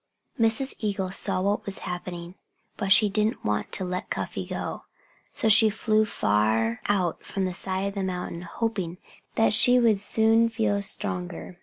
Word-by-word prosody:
Mrs. 230 +4 +1
Eagle 195 -3 -2
saw 185 -1 +2
what 200 +2 0
was 200 - -3
happening. 175 -1 -6 0.4
But 200 -2 -3
she 210 +2 +6
didn't 210 +2 -1
want 105 0 -1
to 190 - 0
let 180 0 -4
Cuffy - - -4
go. - - -5 0.5
So - - -1
she 220 +1 +7
flew 215 0 +1
far 110 - 0
out 185 -4 0
from 195 -1 -3
the 185 - -3
side 190 +2 -2
of - - -9
the 200 - -3
mountain, 180 -2 -4
hoping 185 -2 -3 0.4
that 225 -1 +3
she 245 +2 +7
would 225 -4 +3
soon 225 +2 +2
feel 220 -3 0
stronger. 180 -2 -5
195 Hz, 165 wpm, -26 LUFS, 180-220 Hz, 0.5 s, she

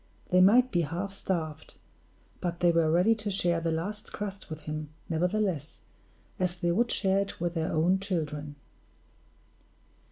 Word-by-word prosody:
They 180 0 +6
might 245 +7 +6
be 175 - +2
half 175 +6 -3
starved, 160 -6 -3 0.6
but 175 -1 -3
they 175 -1 +4
were 165 -1 +3
ready 180 +7 +4
to 215 -2 -4
share 175 -4 +1
the 165 0 0
last 200 +6 -4
crust 200 -1 -6
with 155 -1 -6
him, 155 0 -5 0.2
nevertheless, 180 -2 -1 0.6
as 180 -1 +1
they 175 -1 0
would 235 +7 +2
share 195 -1 +2
it 200 0 -3
with 170 0 -1
their 165 -2 -1
own 175 +5 +3
children. 150 -6 -3
175 Hz, 155 wpm, -29 LUFS, 160-195 Hz, 0.6 s, They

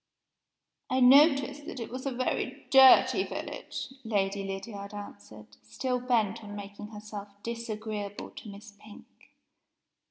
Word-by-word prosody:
"I 260 - +1
noticed 280 +2 +5
that 275 - -6
it 230 - -6
was 255 +2 -5
a - - -1
very 255 0 -2
dirty 265 -1 +7
village," - - -6
Lady 200 -3 -1
Lydiard 200 +1 -6
answered, 105 - -11
still 250 - -3
bent 230 -4 0
on 205 -1 -8
making 205 +1 -8
herself 210 -1 -8 0.2
disagreeable 215 -3 -5
to 215 - -10
Miss 205 +1 -12
Pink. 210 0 -14
215 Hz, 125 wpm, -29 LUFS, 200-250 Hz, 0.2 s, dirty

